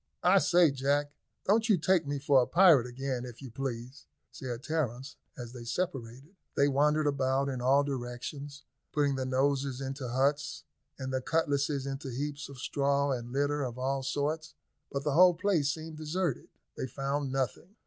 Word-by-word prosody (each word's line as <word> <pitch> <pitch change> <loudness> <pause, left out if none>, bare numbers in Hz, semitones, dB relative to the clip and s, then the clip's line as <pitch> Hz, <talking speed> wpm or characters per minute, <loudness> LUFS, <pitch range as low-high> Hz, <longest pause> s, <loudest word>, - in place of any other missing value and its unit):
"I 185 +2 +6
say, 175 -4 +5
Jack, 140 +2 0 0.3
don't 220 +3 +3
you 205 - +6
take 165 -1 +2
me 145 0 -1
for 140 -1 +4
a 125 - 0
pirate 170 -9 +6
again, 130 0 -3
if 120 -2 -9
you 130 -4 -9
please," 130 +1 -5 0.2
said 125 -2 -6
Terence, 140 -4 -2 0.2
as 120 -1 -7
they 120 -2 -8
separated. 135 - -4 0.2
They 140 - +4
wandered 150 +2 +2
about 140 -1 +1
in 130 -2 -3
all 135 +3 +4
directions, 140 +2 -5 0.3
putting 145 -2 +2
their 130 -1 -2
noses 135 0 +1
into 135 -1 -4
huts, 140 +4 0 0.3
and 130 -1 -4
their 130 - 0
cutlasses 145 -2 0
into 135 0 -4
heaps 145 +4 -4
of 140 - -10
straw 140 +2 +1
and 120 -2 -3
litter 145 +2 0
of 125 -3 -3
all 135 +1 -1
sorts; 150 +4 -2 0.4
but 140 -1 -2
the 150 -1 0
whole 180 +3 +7
place 170 -6 +1
seemed 160 0 -7
deserted. 155 -1 -2 0.3
They - - -3
found 140 +1 -2
nothing. 135 - -3
140 Hz, 170 wpm, -30 LUFS, 130-150 Hz, 0.4 s, whole